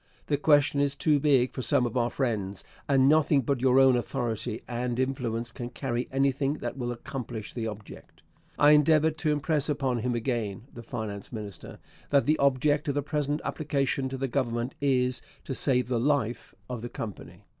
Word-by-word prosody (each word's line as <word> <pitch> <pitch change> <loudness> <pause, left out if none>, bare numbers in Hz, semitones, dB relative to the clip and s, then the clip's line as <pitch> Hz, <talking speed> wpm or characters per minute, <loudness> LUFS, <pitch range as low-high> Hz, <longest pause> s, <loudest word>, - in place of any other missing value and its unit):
The 145 - 0
question 145 -1 +3
is 140 -1 +1
too 150 0 +2
big 135 -3 +3
for 130 - -4
some 125 +1 +2
of 120 - -4
our 120 -1 +2
friends, 105 -8 -2 0.3
and 135 -1 +5
nothing 150 -1 +4
but 130 0 -1
your 130 0 +5
own 135 -1 +6
authority 115 -3 -3
and 120 0 -2
influence 120 -3 -2
can 120 -1 -6
carry 125 -2 -3
anything 135 +1 +1
that - - -5
will 120 -2 -3
accomplish 120 -3 -6
the 115 -2 -3
object.... 105 -1 -10 0.3
I 145 0 +6
endeavoured 155 +1 +4
to 155 -2 +1
impress 150 0 0
upon 135 -4 0
him 120 +1 -1
again 115 -5 -2
[the 120 - -8
finance 110 -4 -5
minister] 105 -6 -8 0.3
that 140 -1 +3
the 155 +1 +2
object 140 +2 +2
of 140 - 0
the 145 - 0
present 150 0 -1
application 140 -3 -1
to 135 - -4
the 135 +1 -1
Government 120 -1 -1
is 125 -2 +1 0.2
to - - -3
save 125 -2 +1
the 125 -2 0
life 125 -3 -1
of 125 -3 -5
the 120 - -5
Company.... 105 -4 -8
130 Hz, 185 wpm, -28 LUFS, 120-145 Hz, 0.3 s, own